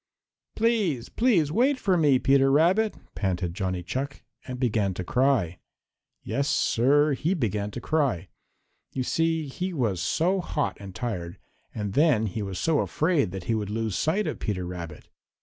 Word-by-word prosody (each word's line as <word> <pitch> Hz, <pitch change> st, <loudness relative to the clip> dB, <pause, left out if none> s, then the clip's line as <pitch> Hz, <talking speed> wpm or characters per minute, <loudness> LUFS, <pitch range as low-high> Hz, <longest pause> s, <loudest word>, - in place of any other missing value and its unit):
"Please, 215 Hz, -, +1 dB
please 195 Hz, -, +2 dB
wait 260 Hz, -, +3 dB
for 195 Hz, -7 st, +1 dB
me, 150 Hz, -6 st, +4 dB
Peter 135 Hz, +2 st, +4 dB
Rabbit," 180 Hz, +10 st, +3 dB, 0.2 s
panted 90 Hz, -3 st, -2 dB
Johnny 95 Hz, -2 st, -2 dB
Chuck, 135 Hz, +9 st, -4 dB, 0.2 s
and 125 Hz, -1 st, -5 dB
began 105 Hz, -6 st, +1 dB
to 90 Hz, -, -4 dB
cry. 120 Hz, -6 st, +1 dB, 0.6 s
Yes, 140 Hz, +1 st, -1 dB
Sir, 145 Hz, +3 st, +3 dB
he 165 Hz, +8 st, 0 dB
began 105 Hz, -, -1 dB
to 115 Hz, -, -6 dB
cry. 130 Hz, -, 0 dB, 0.6 s
You 130 Hz, -, -1 dB
see 165 Hz, +3 st, 0 dB
he 180 Hz, +7 st, -4 dB
was 110 Hz, -, 0 dB
so 185 Hz, +4 st, +1 dB
hot 150 Hz, -4 st, -2 dB
and 100 Hz, -2 st, -9 dB
tired, 90 Hz, -8 st, -4 dB, 0.4 s
and 105 Hz, -2 st, -3 dB
then 140 Hz, -6 st, +3 dB
he 110 Hz, +1 st, -3 dB
was 95 Hz, -2 st, -4 dB
so 160 Hz, -, +1 dB
afraid 155 Hz, -, +1 dB
that 95 Hz, 0 st, -6 dB
he 115 Hz, -, -1 dB
would 105 Hz, -2 st, -2 dB
lose 110 Hz, -2 st, -2 dB
sight 190 Hz, +7 st, +1 dB
of -, -, -3 dB
Peter 95 Hz, -4 st, -2 dB
Rabbit. 85 Hz, -4 st, -7 dB
130 Hz, 165 wpm, -26 LUFS, 100-160 Hz, 0.6 s, me